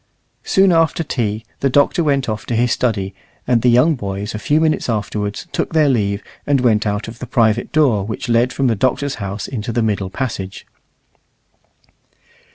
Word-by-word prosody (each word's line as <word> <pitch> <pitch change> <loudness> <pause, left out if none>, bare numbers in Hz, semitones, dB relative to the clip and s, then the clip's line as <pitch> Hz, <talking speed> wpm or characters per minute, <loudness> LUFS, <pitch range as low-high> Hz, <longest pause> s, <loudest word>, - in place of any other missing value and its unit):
Soon 195 -1 +4
after 165 0 +2
tea 110 -7 -2
the 135 - +1
Doctor 145 +5 +3
went 140 -4 +1
off 110 -1 -4
to 120 - -1
his 120 +1 +2
study, 100 -7 0 0.3
and 120 -2 +2
the 125 - +4
young 125 +7 +5
boys 100 -4 -4
a 105 - -4
few 150 +7 +2
minutes 160 -4 +1
afterwards 105 - -2
took - - -2
their 155 -3 +4
leave 100 -5 0 0.2
and 140 -1 +3
went 110 -4 +2
out 105 +1 -2
of 115 +1 -9
the 125 - -6
private 115 -2 +1
door 135 -10 +3
which 110 +5 -5
led 120 +2 +2
from 135 - -1
the 120 - +3
Doctor's 130 +5 0
house 100 +1 -4
into 120 -2 -4
the 115 0 0
middle 100 -3 -1
passage. 100 -5 -5
120 Hz, 180 wpm, -18 LUFS, 105-135 Hz, 0.3 s, young